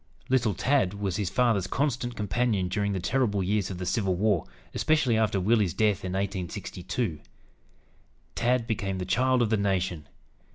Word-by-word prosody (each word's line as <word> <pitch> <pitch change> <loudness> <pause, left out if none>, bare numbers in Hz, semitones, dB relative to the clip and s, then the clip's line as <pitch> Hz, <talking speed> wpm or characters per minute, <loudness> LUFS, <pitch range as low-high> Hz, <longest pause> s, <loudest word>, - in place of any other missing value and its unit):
"Little 120 -6 +2
Tad" 125 -5 +1
was 100 -3 -2
his 100 -4 -1
father's 105 -3 +2
constant 125 0 -1
companion 105 -2 0
during 100 +2 0
the 95 - -1
terrible 105 -2 0
years 105 +2 0
of 95 - -5
the 90 - -4
Civil 95 0 0
War, 100 -2 +1 0.3
especially 155 -7 +2
after 110 -3 +1
Willie's 105 -1 +2
death, 105 -3 +1
in 90 -1 -3
1862. 95 -1 -3 1.1
"Tad" 120 0 +1
became 100 -5 -2
"the 90 - -3
child 125 +6 +2
of 110 - -1
the 110 - +3
nation." 90 -6 -1
100 Hz, 160 wpm, -27 LUFS, 95-120 Hz, 1.1 s, the